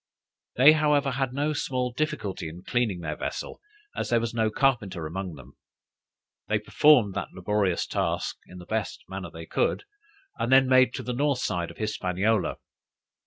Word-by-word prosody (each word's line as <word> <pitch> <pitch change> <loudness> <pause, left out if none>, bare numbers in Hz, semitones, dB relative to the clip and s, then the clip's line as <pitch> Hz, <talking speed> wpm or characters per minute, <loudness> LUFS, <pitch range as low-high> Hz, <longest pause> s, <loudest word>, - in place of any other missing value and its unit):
They, 135 +5 +8
however, 150 -2 +2
had 130 0 -1
no 145 +3 -1
small 125 -3 -2
difficulty 105 - -3
in 85 +3 -11
cleaning 110 -6 0
their 75 -2 -3
vessel, - - -5 0.3
as - - -3
there 120 - +3
was 115 0 -3
no 110 -1 +1
carpenter 105 - 0
among 90 +1 -5
them. 65 -1 -15 0.9
They - - +2
performed 125 -10 +4
that - - -3
laborious 95 -1 0
task - - -2
in 90 - -12
the 90 - -10
best 110 +2 -3
manner 95 -2 -6
they 80 0 -9
could, - - 0 0.6
and 120 - -1
then 135 0 +6
made 130 -1 +4
to - - -5
the 125 - -3
north 140 +2 +1
side 85 -6 -1
of - - -12
Hispaniola. 105 0 0
110 Hz, 165 wpm, -26 LUFS, 90-130 Hz, 0.9 s, They